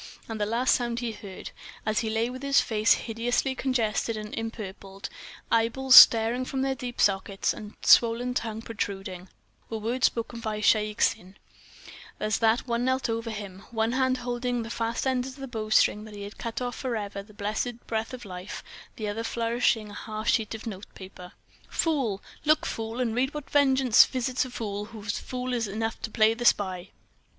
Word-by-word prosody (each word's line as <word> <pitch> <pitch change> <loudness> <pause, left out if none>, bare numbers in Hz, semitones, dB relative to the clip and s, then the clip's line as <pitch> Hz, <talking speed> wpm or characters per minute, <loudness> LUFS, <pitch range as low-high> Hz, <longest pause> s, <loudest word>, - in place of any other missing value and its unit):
And 220 -2 -5
the 205 - +1
last 235 +4 +2
sounds 240 -1 -1
he 235 -2 -2
heard, 200 -3 -9 0.3
as 215 0 +1
he 225 - -1
lay 225 +1 +1
with 255 +2 -8 0.2
face 220 0 +3
hideously 240 +3 -1
congested 230 -4 0
and 210 0 -7
empurpled, 200 -3 -6 0.4
eyeballs 240 +3 +4
starting 230 +2 +9
from 265 +1 -2
their 270 0 +1
deep 245 -1 -7
sockets, 195 0 +1
and 210 0 -9
swollen 240 +2 +5
tongue 225 -2 -3
protruding, 195 -4 -5 0.4
were 225 - -3
words 235 +4 +2
spoken 230 0 -5
by 215 -2 -3
Shaik 215 0 +2
Tsin 185 +2 +1 0.8
as 215 -1 0
that 225 +1 +3
one 235 0 0
knelt 260 -2 +1
over 230 0 -3
him, 200 -4 -7
one 225 0 0
hand 260 0 +1
holding 245 -1 -2
fast 230 0 -2
the 265 - +1
ends 255 0 -1
of 265 - -8
the 270 -1 -7
bowstring 215 -2 +2
that 215 -1 -10
had 205 0 -8
cut 230 +2 -4
off 245 -1 -4
forever 210 -6 -3
the 205 +2 -16
blessed 215 +4 -3
breath 220 0 -2
of 255 -3 -8
life, 180 0 -7 0.3
the 215 - -4
other 215 +2 -3
flourishing 230 -2 0
a - - -10
half 215 +1 -6
sheet 220 -1 +1
of 220 - -9
notepaper. 190 -3 -9 0.4
"Fool! 265 - 0 0.2
Look, 305 0 +3
fool, 225 +2 -4
and 240 -3 0
read 265 +5 0
what 295 -2 -7
vengeance 265 -4 +6
visits 255 +1 -1
a - - -7
fool 205 -4 -4
who 220 -1 -11
is 205 -1 -2
fool 255 0 -4
enough 225 -1 -2
to - - -4
play 220 0 +4
the 235 +1 -6
spy!" 185 -4 +2
225 Hz, 180 wpm, -27 LUFS, 210-245 Hz, 0.8 s, starting